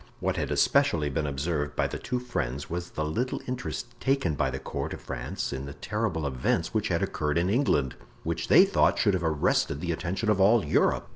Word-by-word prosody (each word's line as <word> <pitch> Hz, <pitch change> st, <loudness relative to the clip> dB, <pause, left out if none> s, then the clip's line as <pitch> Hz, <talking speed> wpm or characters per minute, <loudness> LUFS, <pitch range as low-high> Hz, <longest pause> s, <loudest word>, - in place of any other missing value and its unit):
What -, -, 0 dB
had -, -, -2 dB
especially 75 Hz, -3 st, +2 dB
been 75 Hz, +3 st, -1 dB
observed 75 Hz, +1 st, -2 dB
by -, -, +1 dB
the -, -, -4 dB
two 125 Hz, +1 st, -2 dB
friends 70 Hz, -, -3 dB
was 90 Hz, +1 st, -3 dB
the 75 Hz, -, -3 dB
little 120 Hz, +12 st, -1 dB
interest 125 Hz, 0 st, -4 dB
taken 135 Hz, -, +1 dB
by 70 Hz, -2 st, 0 dB
the 65 Hz, -, -3 dB
court 65 Hz, -, -4 dB
of -, -, -12 dB
France 60 Hz, 0 st, -4 dB
in 70 Hz, 0 st, -5 dB
the 70 Hz, -, -8 dB
terrible 80 Hz, -1 st, -2 dB
events 65 Hz, -3 st, 0 dB
which -, -, +1 dB
had -, -, 0 dB
occurred 75 Hz, +1 st, -1 dB
in 90 Hz, +3 st, +2 dB
England, 100 Hz, -, +2 dB, 0.3 s
which 85 Hz, 0 st, -2 dB
they 190 Hz, -, +8 dB
thought 195 Hz, -, +3 dB
should 100 Hz, -, +3 dB
have 90 Hz, -, 0 dB
arrested 75 Hz, -2 st, +1 dB
the 85 Hz, +1 st, -2 dB
attention 90 Hz, +6 st, -2 dB
of 100 Hz, -2 st, +2 dB
all 105 Hz, +2 st, +5 dB
Europe. -, -, +2 dB
80 Hz, 210 wpm, -27 LUFS, 70-100 Hz, 0.3 s, they